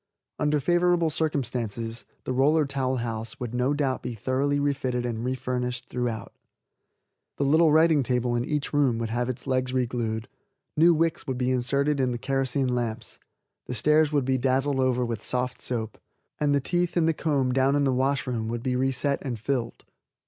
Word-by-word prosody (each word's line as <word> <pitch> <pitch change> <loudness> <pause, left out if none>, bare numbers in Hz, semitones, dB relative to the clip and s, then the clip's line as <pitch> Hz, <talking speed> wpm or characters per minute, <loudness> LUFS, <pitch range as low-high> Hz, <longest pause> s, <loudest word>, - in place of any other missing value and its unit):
Under 150 0 +2
favorable 175 +1 +2
circumstances 120 -7 -2 0.2
the 130 - -2
Roller 150 +4 +3
Towel 135 -1 -1
House 115 -2 -4
would 120 -2 -5
no 125 +2 +1
doubt 135 -3 0
be 120 - -5
thoroughly 135 +5 0
refitted 130 -4 -1
and 115 -1 -3
refurnished 125 -1 -3
throughout. 120 -4 -3 1.0
The - - 0
little 155 +3 +4
writing 160 -1 +5
table 125 -1 0
in 120 - 0
each 150 +2 -2
room 140 -5 +3
would 115 -1 -3
have 120 +1 -1
its 125 -1 -5
legs 130 -1 0
reglued, 120 -3 -1 0.5
new 170 +2 +5
wicks 165 0 0
would 130 -2 -2
be 125 0 0
inserted 140 +4 +1
in 130 -2 +1
the - - -3
kerosene 135 0 0
lamps, 120 -2 -3 0.5
the 125 - -4
stairs 150 +5 +3
would 145 -3 +1
be 130 0 +1
dazzled 135 +2 +1
over 125 -1 +2
with 115 -2 -4
soft 125 0 -2
soap, 110 -3 -4 0.4
and 145 -1 +2
the - - +3
teeth 175 +5 -1
in 165 - +3
the 165 - +3
comb 140 -5 0
down 135 +2 +3
in 145 - +2
the 135 -2 +2
wash 135 +1 +1
room 115 -3 -2
would 120 +1 -3
be 130 -1 0
reset 135 +2 0
and 125 -5 -4
filled. 120 0 -3
130 Hz, 185 wpm, -26 LUFS, 120-145 Hz, 1.0 s, writing